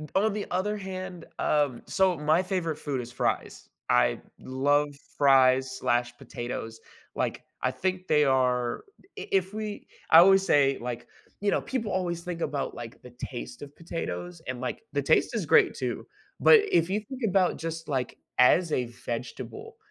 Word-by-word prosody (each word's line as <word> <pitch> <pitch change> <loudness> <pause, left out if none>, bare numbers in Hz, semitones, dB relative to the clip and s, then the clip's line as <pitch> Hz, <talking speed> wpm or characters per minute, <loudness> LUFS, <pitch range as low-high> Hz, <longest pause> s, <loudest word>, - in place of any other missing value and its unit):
On 205 +1 +3
the 210 -1 -3
other 200 +4 0
hand 185 -2 -7
Um, 145 -5 +1
so 190 -2 +2
my 155 +5 +2
favorite 170 -5 -2
food 140 -4 -3
is 120 0 -9
fries. - - -2 0.2
I - - +3 0.2
love 145 +3 +1 0.3
fries/ 130 -2 +5
slash 120 0 0
potatoes, 120 -3 -6 0.4
like, - - -2 0.2
I - - +1
think 185 0 -3
they 150 -1 +4
are 125 -2 +1 0.3
i - - -6
if 190 0 +1
we 215 -1 -5 0.2
I 160 - +9
always 195 +2 +6
say, 140 -4 +3
like 120 -1 -5 0.3
You 205 -1 +1
know, - - +1
people 230 -6 -3
always 175 -2 -1
think 175 -1 -5
about, 145 -3 -2
like, 115 -1 -9
the 125 - -13
taste 120 +2 -7
of 145 0 -10
potatoes, 90 - -5
and, 125 -1 -4
like, 130 - -4
the - - +1
taste - - +2
is - - -1
great, - - +5
too, - - -4 0.3
but 455 - +8
if 170 +1 +3
you 200 +3 +1
think 255 +5 -9
about 185 -1 +2
just 165 0 -5
like, 130 -4 -2 0.2
as 165 +7 +5
a 125 - +1
vegetable, 120 - -7
150 Hz, 170 wpm, -27 LUFS, 125-185 Hz, 0.4 s, I